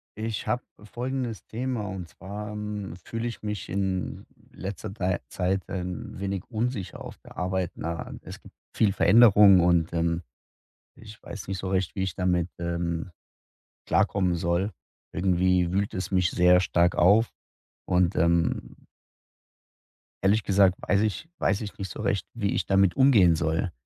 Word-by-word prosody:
ich 110 -1 -4
habe 125 0 0 0.2
folgendes 120 0 -4
Thema. 120 -2 -3
Und 95 -3 -6
zwar, 105 +4 -7
ähm, 105 -3 -5
fühle 115 +1 -3
ich 115 - -7
mich 105 -3 -4
in 95 -1 -2 0.3
letzter 95 0 -6
dei 95 -3 -1
Zeit 95 +1 -1
ein 90 0 -5
wenig 100 -1 -3
unsicher 115 -3 -3
auf - - -9
der - - -16
Arbeit. 90 -1 -1
Na, 85 +1 -5
äh, - - -8
es - - -9
gibt - - -16 0.2
viel 100 -3 +3
Veränderung 105 -2 +7
und, 85 -1 +2
ähm, 85 0 0 0.8
ich 110 0 -13
weiß 100 -2 -8
nicht 95 - -3
so 95 - -4
recht, 95 -1 -1
wie 95 - -2
ich 95 -2 -2
damit, 90 -2 0
ähm, 85 0 -3 0.8
klarkommen 95 -3 +2
soll. 85 +4 0 0.4
Irgendwie 90 -1 +2
wühlt 100 +2 0
es 95 +2 -4
mich 90 -2 +2
sehr 90 +1 +5
stark 85 -1 +2
auf 105 +6 +4 0.5
und, 90 0 +2
ähm 85 +1 0 1.4
ehrlich 105 +2 +3
gesagt 95 -2 +4
weiß 100 - +3
ich 110 +9 -2
weiß 95 +1 +1
ich 105 - -7
nicht 100 -1 -5
so - - -7
recht, 100 - -1
wie 100 -4 -1
ich - - 0
damit 95 -2 +3
umgehen 110 -11 +6
soll. 85 +3 -1
95 Hz, 155 wpm, -26 LUFS, 90-105 Hz, 1.4 s, Veränderung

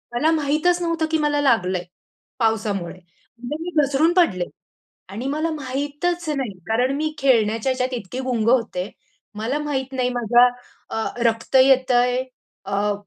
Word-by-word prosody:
मला 305 +7 +3
माहीतच 315 +3 +1
नव्हतं 335 -2 0
की 320 - +3
मला 295 -1 +1
लागलंय 185 -9 +2 0.6
पावसामुळे. 210 -6 -1 0.4
म्हणजे 245 +5 -5
मी 355 - -4
घसरून 285 +5 +2
पडले 215 - +2 0.6
आणि 215 +6 -6
मला 310 +4 -1
माहीतच 295 +5 -3
नाही. 265 -7 -2 0.2
कारण 245 +4 +1
मी 310 0 -2
खेळण्याच्या 230 -3 +2
ह्याच्यात 255 0 -1
इतकी 230 +5 -7
गुंग 235 -4 -1
होते, 220 -6 +1 0.5
मला 230 +7 -1
माहीत 270 -3 -3
नाही 255 -1 0
माझ्या 245 0 +4 0.4
अ, 225 - -2 0.2
रक्त 225 +3 -2
येतंय 255 -1 +3 0.4
अ, 200 +1 0
255 Hz, 140 wpm, -22 LUFS, 225-295 Hz, 0.6 s, माझ्या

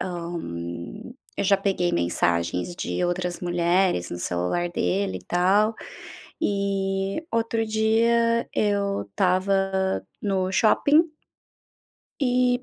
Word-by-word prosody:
Hã, 175 -1 -4 1.0
eu - - -1
já 200 +1 +5
peguei 190 -3 0
mensagens 85 - 0
de 180 - -2
outras 175 0 -2
mulheres 175 - +1
no 85 - -5
celular 90 - -1
dele 195 +2 -1
e - - -19
tal. 200 +5 +2 0.7
E 195 +4 -1
outro 230 0 0
dia 230 +2 +2
eu 200 -1 +1
estava 190 0 0 0.2
no 190 -2 0
shopping 285 - +4 1.2
e 250 -1 +2
195 Hz, 100 wpm, -25 LUFS, 175-215 Hz, 1.2 s, já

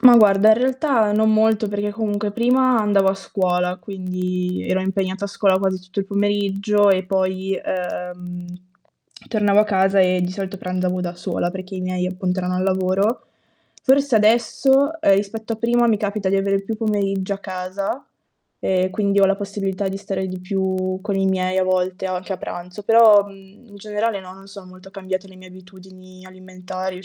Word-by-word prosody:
Ma, 245 -2 +9
guarda, 210 -1 +6
in 220 - +8
realtà 255 -3 +1
non 220 +1 +3
molto 220 0 +3
perché 205 0 -2
comunque 205 -1 -2
prima 250 +2 +2
andavo 200 -2 +3
a 190 - +1
scuola, 180 -2 -1
quindi 185 -1 -4
ero 190 +1 +1
impegnata 190 +1 -2
a - - -1
scuola 195 -1 +2
quasi 190 -1 -1
tutto 185 +1 -9
il 195 - 0
pomeriggio 205 0 +1
e 190 -1 +3
poi, 190 0 -1
ehm, 180 -1 -5 0.8
tornavo 210 -3 +2
a 210 - +6
casa 195 -1 +2
e 185 -1 +3
di 180 0 -1
solito 195 0 -5
pranzavo 185 0 -2
da 175 -1 -4
sola, 175 0 -2
perché 185 +1 -8
i 185 - -4
miei 185 0 -2
appunto 185 0 -2
erano 180 0 -2
al 185 - -1
lavoro. 190 +4 0 0.6
Forse 275 -1 +3
adesso, 265 +7 +3
ehm, 195 -1 +5
rispetto 220 +3 -3
a - - -10
prima, 235 +1 +2
mi 220 - +3
capita 205 -1 -2
di 195 - +2
avere 195 0 +1
più 220 +2 -4
pomeriggio 200 -3 -1
a - - -8
casa 190 +5 -4 0.6
e 185 0 +1
quindi 200 0 +1
ho - - +6
la 195 0 +1
possibilità 200 -1 -3
di 190 +1 -3
stare 195 -1 -4
di 185 -1 -6
più 185 0 -2
con 200 0 -3
i 195 0 +1
miei 185 0 0
a - - +3
volte 185 +1 -1
anche 185 +1 -4
a 190 - -3
pranzo. 180 +2 -8
Però, 220 -2 +6
mhmm, 195 +3 -16
in 205 - -14
generale 210 0 -2
no, 185 0 -11
non 195 +1 -15
sono 200 -1 -11
molto 185 +1 -14
cambiate 190 0 -5
le 190 - -16
mie 185 0 -14
abitudini 185 0 -15
alimentari 185 0 -7
195 Hz, 185 wpm, -21 LUFS, 185-205 Hz, 0.8 s, Ma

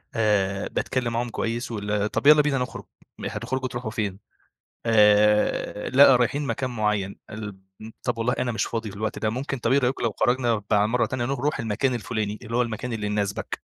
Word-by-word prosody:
آآ 100 -3 +1
باتكلّم 120 -3 -2
معاهم 120 +1 -1
كويّس 115 +2 -3
وال 105 -1 -1
طَب - - 0
يلّا 150 0 +9
بينا 145 -2 0
نخرُج، 125 - -4 0.3
م - - -7
هتخرجوا 130 0 -3
تروحوا 120 -2 -5
فين؟ 100 -3 -3 0.7
آآ، 105 -1 +3
لأ 135 0 +7
رايحين 125 +4 0
مكان 135 -2 -2
معيّن 105 -4 -1
الب 105 -2 -7 0.2
م 110 - -9
طَب 125 -2 -2
والله 115 +2 +1
أنا 125 -1 0
مش 110 - 0
فاضي 115 -2 -4
في 100 - -11
الوقت 110 +1 -3
ده، 110 - 0
ممكن 135 +4 -3
طَب 115 +1 0
إيه 140 - +5
رأيكم 130 -1 0
لو 115 - +1
خرَجنا 120 -3 +2
بع 105 0 +4
مَرّة 115 0 +1
تانية 120 +2 -2
نخ 135 +2 -2
نروح 145 +4 -1
المكان 115 +4 0
الفلاني، 110 -3 -3
اللي 115 0 -4
هو 125 - +4
المكان 120 +1 -4
اللي 105 -2 -3
يناسبك، 105 -1 -2
115 Hz, 200 wpm, -25 LUFS, 105-125 Hz, 0.7 s, يلّا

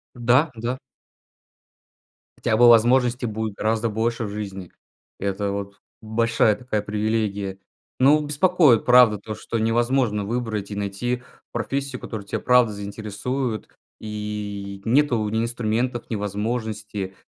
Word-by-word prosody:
Да, 125 +6 +3
да. 120 +3 -3 1.6
Хотя 110 - +1
бы 120 +1 +7
возможностей 120 +2 +4
будет 110 -1 -3
гораздо 110 +2 0
больше 115 +2 -1
в 105 - -4
жизни. 95 -3 -6 0.5
Это 100 +1 -2
вот 100 0 -6 0.2
большая 110 -1 +2
такая 120 -5 -2
привилегия. 105 -2 -2 0.4
Ну, 150 +3 +5
беспокоит, 150 - +4
правда, 125 -4 +6
то, 110 +2 -6
что 115 - -4
невозможно 115 -1 +1
выбрать 110 -2 -3
и - - -4
найти 105 +5 -2 0.3
профессию, 135 -2 -3
которая 105 -3 -6
те, - - -3
правда, 125 -3 +4
заинтересует, 110 +4 -4 0.3
и 105 -2 -5
нету 120 -3 +2
ни 110 +2 0
инструментов, 120 +1 -2
ни 110 - -1
возможности. 105 -1 -3
110 Hz, 120 wpm, -23 LUFS, 105-120 Hz, 1.6 s, бы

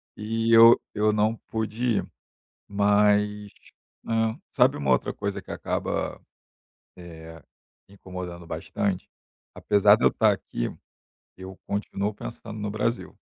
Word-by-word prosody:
e 115 +2 -1
eu 115 +1 +8
eu 105 0 +2
não 105 +1 +1
pude 110 +1 -1
ir. - - -2 0.6
Mas, 105 0 +2 0.5
né, 115 0 0
sabe - - +3
uma 70 -2 -1
outra 65 - +1
coisa 100 0 -4
que - - -17
acaba, - - -3 0.8
eh, 80 -2 -11 0.5
incomodando 90 -3 -8
bastante? 100 -3 -3 0.5
Apesar 105 0 +4
de 115 - -2
eu - - +8
estar 110 -2 +3
aqui, - - -4 0.6
eu 95 0 -10
continuo 100 0 -2
pensando 110 0 -8
no 105 0 -3
Brasil. 115 +3 -3
105 Hz, 120 wpm, -25 LUFS, 95-110 Hz, 0.8 s, eu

